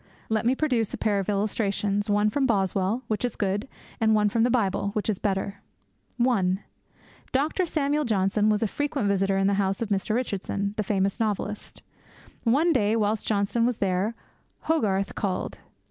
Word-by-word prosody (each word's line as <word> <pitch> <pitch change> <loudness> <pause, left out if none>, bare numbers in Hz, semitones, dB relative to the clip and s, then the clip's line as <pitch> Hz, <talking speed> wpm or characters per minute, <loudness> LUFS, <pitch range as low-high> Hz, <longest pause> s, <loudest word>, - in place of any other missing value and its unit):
Let 220 +1 +1
me 255 - +3
produce 250 -8 0
a - - -8
pair 205 -2 +1
of 195 - -3
illustrations, 205 0 0
one 205 +1 +3
from 270 +3 +1
Boswell, 195 +2 0
which 215 0 -2
is 245 - -1
good; 205 +3 -1 0.3
and 220 -1 +4
one 210 -1 +3
from 225 +2 0
the 240 - +4
Bible, 200 -5 +1
which 215 - -2
is 210 -4 0
better. 200 0 -2 0.6
(1) 200 -7 +2 0.7
Dr. 310 +7 +1
Samuel 300 -1 0
Johnson 210 -2 +2
was 210 +1 +2
a - - +2
frequent 285 -1 -1
visitor 195 0 +1
at 195 - +2
the 200 - +3
house 195 0 0
of 230 - -3
Mr. 200 +1 0
Richardson, 200 -4 -2
the 215 - -1
famous 195 -1 0
novelist. 210 -1 -3 0.6
One 300 +9 +4
day, 215 -4 +2
whilst 215 -1 0
Johnson 210 +2 +1
was 240 -1 +1
there, 195 +3 0 0.5
Hogarth 205 -11 0
called. 190 -3 -3
210 Hz, 175 wpm, -26 LUFS, 200-235 Hz, 0.7 s, and